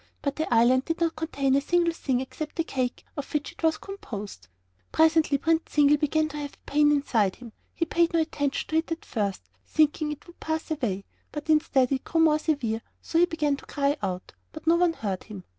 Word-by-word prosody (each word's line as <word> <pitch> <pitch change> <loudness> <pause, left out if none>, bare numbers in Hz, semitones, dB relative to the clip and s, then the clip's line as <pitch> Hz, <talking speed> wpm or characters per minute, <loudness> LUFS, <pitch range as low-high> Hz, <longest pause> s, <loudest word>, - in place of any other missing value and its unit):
But 280 -1 -1
the 315 -4 -2
island 245 +3 +4
did 330 +1 -2
not 335 -1 +1
contain 280 -4 0
a 275 - +4
single 340 +2 +2
thing 260 -6 -1
except 300 +3 -6
the 330 - +1
cake 255 -5 -3
of 285 -2 -6
which 295 0 -1
it - - -16
was 320 -1 +2
composed. 210 - -8 0.4
Presently 320 -2 +4
Prince 325 +3 0
Zingle 295 0 +5
began 310 +1 +1
to 300 - -7
have 290 -1 -5
a - - -15
pain 295 0 +5
inside 230 -9 +2
him. 235 -3 -12 0.2
He 335 - 0
paid 335 +1 +2
no 335 - +2
attention 285 -3 -2
to 315 - +1
it 325 +1 -1
at 330 - -4
first, 200 - -2 0.2
thinking 305 - +1
it 300 - -8
would 345 - -16
pass 315 0 -3
away; 220 -11 -2 0.3
but 300 +1 -2
instead 290 -5 +3
it 265 -1 0
grew 330 - -1
more 310 -1 +5
severe, 250 -9 -1 0.2
so 330 - 0
that - - +6
he - - +7
began 300 -4 0
to - - -13
cry 285 0 +1
out; 185 -2 -4 0.2
but 310 - -10
no 330 +1 +5
one 345 -1 +3
heard 200 - -4
him. 205 -4 -9
295 Hz, 225 wpm, -27 LUFS, 260-320 Hz, 0.4 s, he